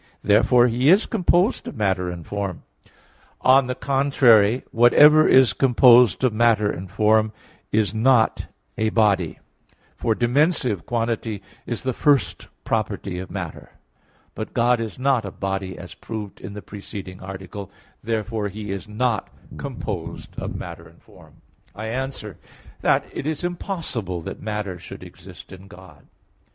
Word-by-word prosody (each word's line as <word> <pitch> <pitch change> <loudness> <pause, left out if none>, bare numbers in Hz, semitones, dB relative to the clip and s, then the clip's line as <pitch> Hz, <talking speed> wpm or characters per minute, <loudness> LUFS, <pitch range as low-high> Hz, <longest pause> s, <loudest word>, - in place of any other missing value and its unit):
Therefore 120 +4 +4
He 125 +3 +2
is 195 +5 +5
composed 185 +1 +1
of - - -7
matter 95 -4 0
and 85 -2 -7
form. 100 -3 -4 0.8
On 130 0 +5
the 125 - -3
contrary, 130 -5 +3
Whatever 150 +6 +6
is 130 -2 +5
composed 125 -3 +5
of 125 -4 +2
matter 110 -2 +3
and 95 +2 -7
form 110 +1 +2 0.4
is 105 -2 +1
a 110 -2 0
body; 100 -7 +1 0.6
for 110 - 0
dimensive 125 - +1
quantity 115 -3 -2 0.2
is 120 - -3
the 130 -1 -1
first 140 -1 +1 0.2
property 100 -4 -2
of 95 - -7
matter. 90 -4 -7 0.6
But 110 - -7
God 120 0 +3
is 110 -3 -5
not 130 -2 +1
a 100 - -5
body 95 -1 -4
as 90 - -9
proved 105 -3 -8
in 100 - -8
the 105 - -8
preceding 100 -2 -9
Article; 95 +1 -8 0.3
therefore 110 -1 -2
He 105 0 -7
is 100 +2 -5
not 110 +1 -1 0.3
composed - - -6
of - - -5
matter - - -8
and - - -21
form. - - -20 0.3
I 110 +1 -5
answer 125 - -5 0.4
that, - - +2
It 140 - -5
is 155 +1 -3
impossible 165 - -4
that - - -8
matter 105 -4 -4
should - - -10
exist - - -13
in 95 +1 -13
God. 90 -6 -16
110 Hz, 140 wpm, -22 LUFS, 100-125 Hz, 0.8 s, Whatever